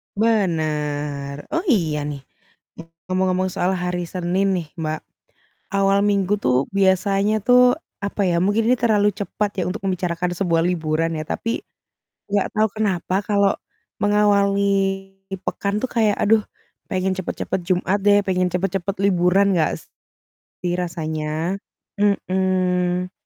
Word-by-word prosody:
Bener. 150 -9 -1
Oh, 330 +3 0
iya 170 - +2
nih, 145 -2 -5 0.9
ngomong-ngomong 185 0 +1
soal 180 +1 0
hari 180 -1 -2
Senin 180 +2 0
nih, 170 -3 -3
Mbak. 155 -1 -2 0.7
Awal 195 0 +3
minggu 200 -1 +2
tuh 125 -4 +1
biasanya 195 +2 +2
tuh, 250 +1 +6 0.3
apa 200 +1 -2
ya, 170 - +1
mungkin 215 +4 +2
ini 250 - +4
terlalu 210 -3 +3
cepat 205 0 -2
ya - - +1
untuk 190 - -5
membicarakan 180 -1 -1
sebuah 170 -4 +1
liburan 165 -2 0
ya, 155 - -3
tapi 230 - -2 0.7
nggak 200 -1 +1
tahu 215 0 +3
kenapa 185 -3 0
kalau 200 -1 +3 0.5
mengawali 205 -1 +3 0.8
pekan 200 +1 -2
tuh 260 - -2
kayak, 220 -3 +2
"Aduh 215 +1 +4 0.5
pengen 190 -1 0
cepat-cepat 185 - -3
Jumat 185 +2 +1
deh." 205 0 +6
Pengen 185 -1 +1
cepat-cepat 195 +1 -1
liburan 195 +1 +3
nggak 160 -2 +2 0.9
sih 175 -1 -1
rasanya? 160 0 -2 0.4
Mhm. 185 -2 +1
185 Hz, 125 wpm, -21 LUFS, 175-205 Hz, 0.9 s, tuh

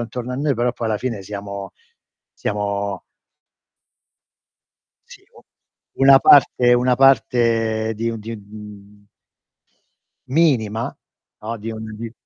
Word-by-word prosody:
intorno 120 +2 -5
a - - -3
noi, 140 0 0
però 120 +1 0
poi 115 -2 -4
alla 105 -2 -1
fine 115 -6 -4
siamo 100 -1 -7 0.6
siamo 100 -1 -3 2.1
Sì - - -15
u - - -15 0.6
una 135 0 +8
parte 125 -3 +5
una 125 +1 +2
parte 115 -4 +2
di 115 +2 -3
un 115 - -6
di, 115 +2 -7
mhmm 105 0 -14 1.2
minima, 120 -8 0 0.5
no, 115 +2 -4
di 110 +2 -6
un 110 0 -7
di 115 0 -7
115 Hz, 115 wpm, -20 LUFS, 105-125 Hz, 2.1 s, una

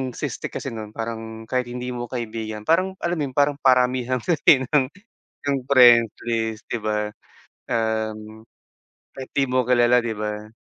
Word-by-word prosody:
siste - - -4
kasi - - -6
no'n, 110 -1 -8
parang 115 -1 -6
kahit 125 +2 -2
hindi 125 +1 -5
mo 120 -1 -5
kaibigan, 110 -3 -5
parang 185 - +1
alam 170 +1 0
mo 150 - 0
yun, 130 - -11
parang 145 0 +2
paramihan 125 -1 +2
kasi 145 -5 +4
ng 130 0 +2 0.6
yung 140 -1 +1
friend 120 -4 +7 0.2
list 110 -2 -1
'di - - -1
ba? 105 -1 -2 0.6
Um, 110 -1 -3 0.7
kahit 130 -1 -8
di 135 - +4
mo 130 0 +1
kilala, 125 0 +4
'di 115 -1 -3
ba? 105 0 -4
120 Hz, 160 wpm, -23 LUFS, 110-130 Hz, 0.7 s, friend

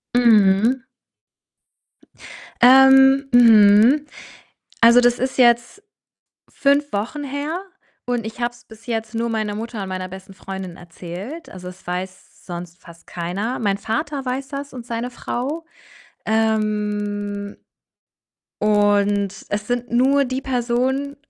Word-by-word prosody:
Mhm. 225 +1 +4 1.8
Ähm 265 +2 +6
mhm. 230 +4 +6 0.8
Also, 235 +2 +7
das 245 0 +2
ist 260 +1 -3
jetzt 240 - +2 0.7
5 285 +1 +1
Wochen 230 +9 -3
her 290 +6 -4 0.4
und 245 -3 -2
ich 225 +2 -8
habe 240 0 0
es 240 - -20
bis 220 +1 -17
jetzt 225 -1 -4
nur 230 +1 -1
meiner 215 -2 -2
Mutter 225 -1 -6
und 190 - -6
meiner 185 0 -5
besten 190 +1 -12
Freundin 190 -2 -8
erzählt. 180 - -9
Also, 180 -1 -9
es 185 0 -14
weiß 185 +1 -7
sonst 175 0 -8
fast 170 -1 -16
keiner. 190 +8 -4
Mein 200 -3 -1
Vater 275 +7 -3
weiß 265 +1 -4
das 280 0 -7
und 245 -2 -9
seine 235 +1 -4
Frau. 275 +6 -5 0.6
Ähm, 210 -2 -2 1.0
und 205 -1 +1
es 205 0 -3
sind 245 0 -3
nur 265 +4 +3
die 260 0 -3
Personen 260 +3 -1
230 Hz, 125 wpm, -20 LUFS, 205-260 Hz, 1.8 s, Also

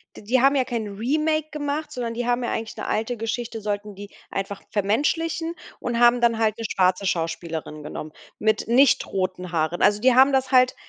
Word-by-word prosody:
d - - -11
die 245 +5 +2
haben 275 +1 +5
ja 260 - +3
kein 230 -4 -3
Remake 305 +9 -1
gemacht, 295 0 -3
sondern 235 -2 -4
die 240 +1 -3
haben 245 0 0
ja - - -2
eigentlich 225 -1 -4
'ne - - -5
alte 225 +2 -1
Geschichte 225 0 -4
sollten 205 -1 -4
die 205 +1 -9 0.2
einfach 195 0 -4
vermenschlichen 325 - 0 0.2
und 235 -1 -2
haben 240 0 +5
dann 230 -1 +3
halt 220 -1 +1
'ne 225 - -5
schwarze 185 +1 +2
Schauspielerin 165 -3 -3
genommen 155 +1 -7 0.3
mit 215 0 +1
nicht 260 +4 +4
roten 185 -2 -3
Haaren. 165 +1 -1
Also, 205 0 +4
die 255 -1 +4
haben 265 +2 +7
das 265 0 +1
halt 255 0 +5
230 Hz, 200 wpm, -24 LUFS, 200-260 Hz, 0.3 s, haben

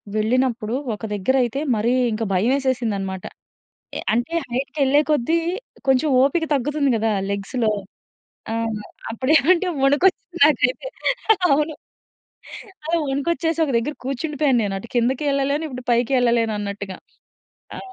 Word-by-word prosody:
వెళ్ళినప్పుడు 230 0 0 0.2
ఒక - - -17
దగ్గర 205 +6 0
అయితే 240 +4 -2 0.2
మరీ 220 +3 +1 0.2
ఇంకా 225 +1 -2
భయమేసేసిందనమాట. 220 -4 0 0.7
అ - - -2 0.2
అంటే 240 +8 -1 0.2
హైట్‌కెళ్ళే 275 +3 +1
కొద్దీ 300 +3 +2 0.5
కొంచెం 265 +3 +3
ఓపిక 305 +5 +2
తగ్గుతుంది 285 +1 0
కదా! 225 0 0 0.2
లెగ్స్‌లో. 215 +3 -1 0.8
ఆ! - - -1 0.6
అప్పుడేవంటే 315 - +3
వణుకొచ్చిసింది 345 +5 +2
నాకైతే. 265 - +1 0.6
అవును. 300 +2 +1 1.1
అలా 340 +1 +1
వణుకొచ్చేసొక 325 +2 0
దగ్గర 240 +6 -1
కూర్చుండిపోయాను. 275 0 0
నేనటు 195 +2 -4
కిందకి 250 +4 +1
యెళ్ళలేను. 280 +2 0
ఇప్పుడు 250 -2 -8
పైకి 240 +2 +1
యెళ్ళలేనన్నట్టుగా. 210 -5 -1 0.8
ఆ! - - -6
260 Hz, 105 wpm, -22 LUFS, 225-295 Hz, 1.1 s, కొంచెం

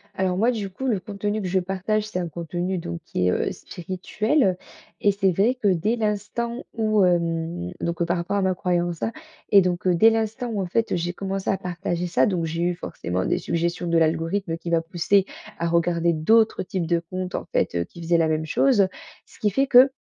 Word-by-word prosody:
Alors 185 -1 0
moi 235 +5 +3
du 205 -4 -3
coup, 265 +8 -7
le 220 -7 +1
contenu 205 +2 -3
que 185 - -3
je 190 +1 +2
partage, 195 +3 -1
c'est 180 -4 -3
un 175 -2 -3
contenu 175 +3 -3
donc 85 - -5
qui 90 - -2
est, - - +3
heu, - - 0
spirituel 185 - -1 0.4
et 205 - +4
c'est 195 -1 +2
vrai 215 +9 +2
que 225 -5 -1
dès 195 +6 +1
l'instant 225 +2 -2
où, 215 -3 +2
hem, 170 0 0
donc 170 0 -1
par 175 +1 0
rapport 170 +4 -2
à 195 - +1
ma 190 -1 +2
croyance, 175 -2 -1
hein, 225 - 0 0.4
et 200 -1 +7
donc, 180 0 -1
heu, 180 - +4
dès 225 +6 +6
l'instant 225 +2 -1
où 205 -3 -2
en 180 - -2
fait, 225 +3 0
j'ai 175 +1 -2
commencé 195 0 -3
à 195 - +2
partager 175 -1 -3
ça, 175 - +2
donc 175 -4 0
j'ai 165 +1 -3
eu 175 0 +1
forcément 90 - -3
des - - +1
suggestions 170 +1 -2
de 170 - +2
l'algorithme 165 +3 0
qui 170 - -7
m'a 165 -1 +2
poussé 180 +3 +2 0.3
à 170 - -1
regarder 170 0 +2
d'autres 220 +8 +3
types 180 -2 -3
de 170 0 +1
compte 185 +2 -6
en - - -3
fait, - - +1
heu, 85 0 0
qui 170 - -14
faisaient 170 0 +2
la 160 - +3
même 155 0 0
chose. 205 +1 +3 0.4
Ce - - -20
qui 210 - +2
fait 270 +7 +2
que, 260 +1 +7
180 Hz, 220 wpm, -24 LUFS, 170-205 Hz, 0.4 s, et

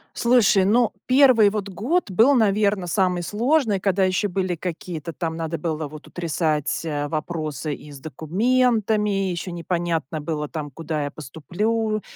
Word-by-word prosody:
Слушай, 235 -5 +4
ну, 230 +2 +3 0.2
1 255 -5 +6
вот 205 -1 -4
год 225 - -1
был, 235 +9 +5
наверное, 205 -4 +2
самый 180 -1 0
сложный, 230 - +1
когда 195 0 +1
ещё 185 +2 0
были 185 -1 -1
какие-то 165 -1 -5
там 160 0 -4
надо 165 0 -3
было 155 -3 -3
вот 155 +1 -12
утрясать, 160 -3 -1
э, 145 -2 -2
вопросы 155 -2 -3
и 150 - -10
с 140 - -10
документами, 210 - +1
и - - -1
ещё 175 +1 -4
непонятно 170 -3 -2
было 150 -1 -3
там 150 -1 -5
куда 155 +1 -4
я - - -3
поступлю, 210 - -2
180 Hz, 155 wpm, -23 LUFS, 160-215 Hz, 0.2 s, 1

